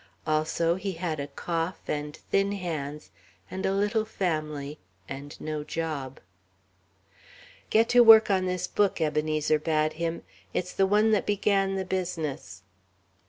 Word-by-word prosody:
Also, 155 +2 +1
he 190 0 -3
had 165 -3 -3
a 140 - -3
cough 165 +4 -3
and 150 0 -3
thin 195 +1 +2
hands 150 - -5 0.4
and 190 +1 -2
a - - +1
little 210 +2 +1
family 155 -8 -3 0.3
and 140 +2 -8
no 155 -1 -4
job. 150 -5 -4 1.5
"Get 225 +1 +4
to 245 - +5
work 225 -3 +9
on 185 -1 +2
this 180 0 -1
book," 205 -1 +1
Ebenezer 155 0 +1
bade 155 0 +1
him; 165 +1 -3 0.3
"it's 180 0 -2
the 195 - +2
one 210 +2 +3
that 210 - +1
began 195 -1 +1
the 190 0 -2
business." 160 - -4
165 Hz, 140 wpm, -27 LUFS, 150-195 Hz, 1.5 s, work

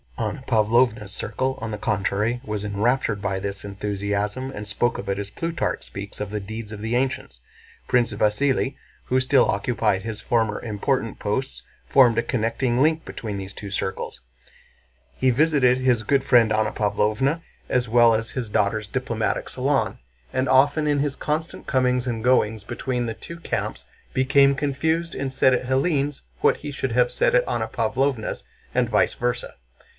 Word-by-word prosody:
Anna 115 +4 -3
Pávlovna's 110 -2 +2
circle 130 +6 -2
on 115 - -3
the 105 - -3
contrary 105 +3 0
was 105 -4 -3
enraptured 105 +1 0
by 100 -1 -1
this 100 0 -5
enthusiasm 100 +4 -2
and 105 -4 -7
spoke 115 +3 0
of 100 - -6
it 100 - 0
as 100 -1 -4
Plutarch 165 +6 -2
speaks 100 +1 -8
of 105 - -3
the 105 +1 -3
deeds 110 +2 -7
of 105 -1 -7
the 115 +2 -1
ancients. 130 - -2 0.5
Prince 120 -3 +2
Vasíli, 130 +6 +1 0.3
who 130 - +2
still 130 0 +4
occupied 100 -2 0
his 110 -1 -5
former 110 -4 +1
important 115 +2 -2
posts, 130 +6 -2 0.2
formed 125 -4 +5
a 115 - +3
connecting 120 +1 0
link 160 +2 +3
between 105 -3 -5
these 95 0 -6
two 100 - -7
circles. 95 -1 -3 1.0
He 130 - +3
visited 135 -2 +3
his 125 -3 +2
"good 135 +5 +2
friend 120 -4 +5
Anna 110 -1 +1
Pávlovna" 110 +9 +1 0.3
as 125 -2 +1
well 120 0 +6
as 115 +1 -2
his 125 -4 -4
daughter's 105 0 0
"diplomatic - - -2
salon," - - 0 0.3
and 130 +1 0
often 145 +3 +4
in 145 -1 +2
his 140 -1 0
constant 155 +2 -3
comings 125 -1 +1
and 115 -2 -2
goings 110 -4 +2
between 120 +2 -2
the 115 - -4
two 170 - -9
camps 105 - -3 0.3
became 140 +1 +4
confused 160 +4 -1
and 135 -1 -3
said 130 0 +4
at 125 0 0
Hélène's 140 +2 0 0.2
what - - +4
he 145 - -6
should 135 -2 -3
have 125 +1 +3
said - - +2
at - - +3
Anna - - -1
Pávlovna's 125 +1 -1 0.3
and - - +1
vice - - +3
versa. 120 0 -2
120 Hz, 170 wpm, -24 LUFS, 105-135 Hz, 1.0 s, well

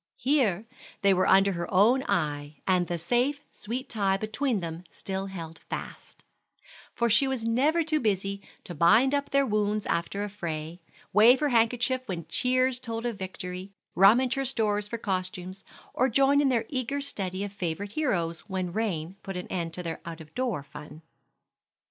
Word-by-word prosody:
Here 230 - +1 0.4
they 200 -1 +6
were 185 0 +2
under 195 +1 +5
her 175 -2 -4
own 220 +8 +5
eye, 145 -2 -1
and 180 -2 +2
the 175 - -2
safe, 245 - +1
sweet 250 +5 -5
tie 200 -5 +1
between 220 +3 -1
them 165 0 -6
still 195 0 -5
held 165 -4 -8
fast; - - -7 0.7
for 235 - +2
she 240 +5 +4
was 260 -4 -2
never 280 +9 +2
too 310 -1 0
busy 200 -3 -1 0.2
to 175 - -8
bind 220 - +5
up 285 0 0
their 275 0 +3
wounds 210 -2 0
after 170 +4 -1
a - - -2
fray, 170 -3 -5 0.3
wave 230 +6 +7
her 295 - +1
handkerchief 245 +2 +2
when 170 -5 -4
cheers 255 0 +2
told 230 -2 -5
of 235 -4 -3
victory, 185 0 -6 0.2
rummage 235 +7 +5
her 275 - -1
stores 210 -5 0
for 235 - -4
costumes, 185 -2 -3 0.3
or 260 +2 +2
join 275 +4 +4
in 280 - +3
their 230 -3 +1
eager 265 +1 -2
study 195 -9 -3
of 205 - -5
favorite 195 +1 -4
heroes 175 - -1
when 185 -2 -3
rain 185 -5 -2
put 195 -1 -6
an 180 - -5
end 170 -3 -2
to 180 - -5
their 165 -1 -5
out 165 -1 -7
of 155 -1 -13
door 245 - -2
fun. 150 +2 -11
205 Hz, 175 wpm, -27 LUFS, 180-250 Hz, 0.7 s, wave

